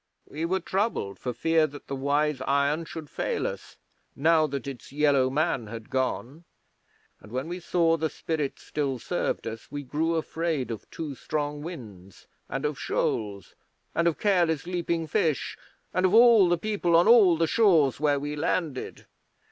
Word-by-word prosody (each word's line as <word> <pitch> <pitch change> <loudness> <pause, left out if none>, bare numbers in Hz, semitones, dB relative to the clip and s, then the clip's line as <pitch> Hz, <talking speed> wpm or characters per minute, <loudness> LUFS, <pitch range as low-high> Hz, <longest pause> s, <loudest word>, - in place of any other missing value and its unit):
'We 155 +3 -4
were 190 +3 0
troubled 185 - -2
for 125 - -3
fear 160 +6 +2
that 145 0 -11
the 135 - -4
Wise 145 +1 0
Iron 140 +4 +1
should 160 -1 -8
fail - - -2
us - - -6 0.4
now 155 +1 +3
that 140 -3 -4
its 130 -4 -8
Yellow 140 -2 +3
Man 135 -5 0
had 115 +3 -9
gone, 130 +3 -2 0.8
and 110 - -15
when 130 +5 -3
we 175 +2 -5
saw 165 -1 +2
the 160 0 -1
Spirit 150 -4 -3
still 140 -3 -3
served - - -2
us 115 0 -7
we 145 0 -5
grew 160 +5 -1
afraid 160 -5 -2
of 110 - -7
too 155 -3 -5
strong 145 +2 -3
winds, 105 - -10 0.2
and 135 +3 -3
of 150 -2 -2
shoals, 100 -4 -2 0.4
and 170 +1 +2
of 165 - +1
careless 175 -7 +2
leaping 170 -2 -1
fish, 155 -1 0 0.4
and 185 - +1
of 190 - +2
all 230 -5 +7
the 175 - +3
people 185 -3 0
on 170 +4 +5
all 210 -8 +7
the 165 - +2
shores 165 - +3
where 145 -2 +2
we 145 +1 -4
landed.' 150 -2 -2
150 Hz, 170 wpm, -27 LUFS, 135-170 Hz, 0.8 s, all